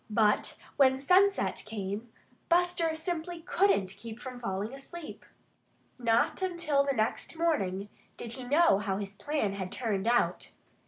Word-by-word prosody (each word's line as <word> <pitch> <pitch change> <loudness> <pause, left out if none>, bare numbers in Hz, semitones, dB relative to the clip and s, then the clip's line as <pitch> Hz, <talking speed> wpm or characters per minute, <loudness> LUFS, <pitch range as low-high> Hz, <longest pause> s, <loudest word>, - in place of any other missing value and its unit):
But 210 -1 +2 0.2
when 265 -1 +5
sunset 370 +8 +3
came, 210 +1 -4 0.4
Buster 345 -2 +2
simply 340 +1 -4
couldn't 345 - +2
keep 225 +2 -8
from 255 -1 -7
falling 205 0 -3
asleep. 305 +4 -9 0.8
Not 230 +7 +2
until 340 -6 +1
the 275 -1 0
next 220 +8 -1
morning 200 - 0 0.3
did 235 -1 -5
he 260 - -6
know 290 - +4
how 195 -2 -1
his 200 -1 -5
plan 210 0 -1
had 190 -2 -5
turned 215 -4 -2
out. 240 +1 +1
250 Hz, 140 wpm, -30 LUFS, 210-330 Hz, 0.8 s, when